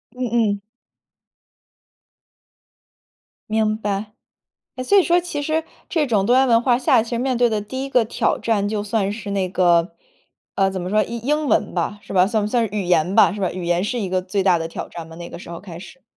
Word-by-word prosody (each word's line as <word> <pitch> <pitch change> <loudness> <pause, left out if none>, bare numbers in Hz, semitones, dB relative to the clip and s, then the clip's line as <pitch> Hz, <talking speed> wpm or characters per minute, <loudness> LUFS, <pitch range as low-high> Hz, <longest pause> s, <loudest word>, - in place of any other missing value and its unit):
嗯 255 0 -2
嗯。 215 -4 +1 2.9
明 215 0 +1
白。 210 0 -3 0.6
诶， 255 - -4
所 400 +10 +4
以 385 - +6
说 350 +1 +3
其 340 -5 -4
实 315 +2 -1 0.3
这 315 -4 +1
种 210 -6 +1
多 245 +4 +4
元 265 0 +4
文 230 -1 +4
化 245 -1 +3
下 250 - +3
其 225 - -7
实 235 - -2
面 255 +1 0
对 240 -1 +3
的 215 -2 0
第 260 +6 -5
一 275 - -5
个 250 -4 +3
挑 220 - 0
战 205 -3 0
就 210 -1 -2
算 205 -1 -1
是 210 -1 -6
那 190 -2 -1
个， 175 -1 +2 0.6
呃， 195 -1 +2
怎 190 -1 -4
么 180 - -4
说？ 215 +2 +3
英 235 +1 -6
英 300 +4 0
文 - - +1
吧， 185 +4 -2
是 195 - -9
吧？ 185 0 +4
算 215 0 0
不 - - -1
算 235 -1 +1
是 - - -16
语 205 - -1
言 175 +1 +1
吧， - - +6
是 205 - -6
吧？ 185 - 0
语 180 -1 -5
言 175 +1 +1
是 240 +4 -2
一 200 - -2
个 185 0 0
最 190 +1 -2
大 180 -3 +4
的 165 0 -3
挑 - - -6
战 165 -1 -9
吗， 160 - -12
那 170 0 -8
个 170 - -9
时 - - -11
候 170 -1 -7
开 175 -4 -10
始？ 265 +7 -13
210 Hz, 250 characters per minute, -21 LUFS, 185-240 Hz, 2.9 s, 以